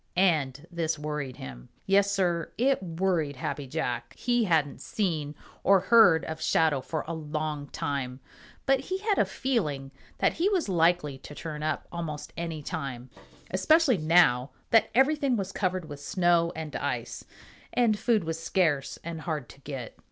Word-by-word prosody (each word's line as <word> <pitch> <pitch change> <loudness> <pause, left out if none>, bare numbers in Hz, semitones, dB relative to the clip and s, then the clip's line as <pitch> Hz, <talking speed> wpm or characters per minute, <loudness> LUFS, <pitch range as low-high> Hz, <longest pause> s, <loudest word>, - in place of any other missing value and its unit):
And 155 -6 +2
this 165 -2 -1
worried 150 -3 -4
him. 60 -2 -9 0.2
Yes, 200 +1 +4
Sir, 180 -4 0
it 265 +1 +2
worried 170 -4 -1
Happy 140 +1 -4
Jack. 130 -4 -3
He 240 -2 +1
hadn't 155 -6 +1
seen 155 -8 -2 0.3
or 195 -1 +6
heard 185 -4 +6
of 160 0 -6
Shadow 155 -4 +2
for 155 +4 -4
a 165 - -3
long 155 -2 -3
time, 135 -3 -3 0.5
but 270 0 +4
he 370 +8 -3
had 415 0 0
a - - +5
feeling 150 - -2 0.3
that - - +2
he 360 +4 +1
was 375 - +1
likely 165 -6 +2
to 145 - -11
turn 150 -2 -6
up 155 - -2
almost 165 -4 -5
any 165 -3 -4
time, 135 -6 -5 0.4
especially 255 - +4
now 155 -6 +4 0.2
that 225 - +5
everything 270 -1 +3
was 195 -1 -3
covered 185 -3 -1
with 145 -2 -8
snow 170 +1 +2
and 155 -2 -6
ice, - - -3 0.5
and 225 -4 +2
food 225 -3 +2
was 165 0 -3
scarce 160 -6 +1
and 165 -1 -5
hard 150 -6 -3
to - - -14
get. 135 -5 -7
165 Hz, 160 wpm, -28 LUFS, 150-195 Hz, 0.5 s, or